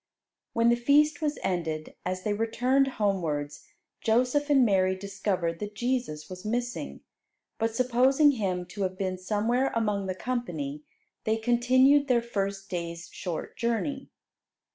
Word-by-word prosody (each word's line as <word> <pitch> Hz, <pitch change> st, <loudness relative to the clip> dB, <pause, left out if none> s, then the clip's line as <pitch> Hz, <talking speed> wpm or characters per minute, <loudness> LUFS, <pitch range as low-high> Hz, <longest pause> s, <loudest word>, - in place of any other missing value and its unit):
When 230 Hz, 0 st, +3 dB
the 235 Hz, -, +5 dB
feast 290 Hz, +5 st, +3 dB
was 300 Hz, -1 st, -1 dB
ended, 160 Hz, -4 st, -2 dB
as 185 Hz, 0 st, -3 dB
they 210 Hz, -, 0 dB
returned 245 Hz, +5 st, +2 dB
homewards, 155 Hz, -8 st, -1 dB, 0.4 s
Joseph 250 Hz, +6 st, +2 dB
and 270 Hz, -3 st, +5 dB
Mary 190 Hz, -3 st, +3 dB
discovered 190 Hz, -3 st, -2 dB
that 210 Hz, 0 st, -6 dB
Jesus 240 Hz, -11 st, -2 dB
was 185 Hz, 0 st, -9 dB
missing; 240 Hz, +3 st, -3 dB, 0.6 s
but 225 Hz, 0 st, 0 dB
supposing 255 Hz, +4 st, +4 dB
Him 190 Hz, -8 st, -2 dB
to 200 Hz, +2 st, -7 dB
have 185 Hz, -1 st, -1 dB
been 185 Hz, -1 st, -2 dB
somewhere 225 Hz, +7 st, 0 dB
among 210 Hz, -4 st, 0 dB
the 185 Hz, -, -2 dB
company, 175 Hz, -, -3 dB, 0.4 s
they 220 Hz, 0 st, +1 dB
continued 255 Hz, +5 st, +4 dB
their 240 Hz, -2 st, +3 dB
first 200 Hz, -4 st, -3 dB
day's 170 Hz, -2 st, -5 dB
short 175 Hz, -4 st, -5 dB
journey. 265 Hz, +4 st, -2 dB
220 Hz, 140 wpm, -28 LUFS, 185-250 Hz, 0.6 s, the